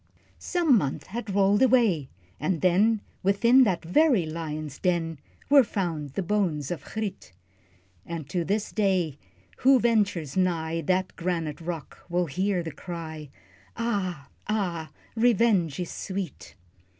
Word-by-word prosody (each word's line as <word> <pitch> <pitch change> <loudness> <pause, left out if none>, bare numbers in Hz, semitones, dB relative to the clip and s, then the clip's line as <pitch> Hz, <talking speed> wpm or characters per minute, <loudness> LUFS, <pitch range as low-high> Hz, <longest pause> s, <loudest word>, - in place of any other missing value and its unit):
Some 330 - +3
months 140 -6 -3
had 220 +1 -6
rolled 200 +1 +4
away, 230 - +3 0.3
and 165 +2 -1
then, 200 +4 +3 0.2
Within 235 +7 +5
that 185 -6 -1
very 235 - +3
lion's 155 -2 -5
den, 165 -4 0 0.3
Were 280 -1 +7
found 165 - -3
the 195 - -2
bones 175 -7 0
of 175 - -4
Griet; 215 - -5 0.7
And 165 -4 -6
to 175 +3 -1
this 205 +5 -1
day, 185 -8 0 0.4
who 265 0 +5
ventures 205 - +1
nigh 165 -3 0
That 185 +3 0
granite 165 -4 -3
rock, 165 -2 -6
will 175 +1 +1
hear 185 +4 -1
the 165 - -5
cry, 160 -2 -7 0.5
"Ah, 185 -11 -2 0.2
ah, 175 -7 -1 0.3
revenge 220 - +3
is 180 - -3
sweet!" 190 -6 -6
180 Hz, 130 wpm, -26 LUFS, 160-210 Hz, 0.7 s, Were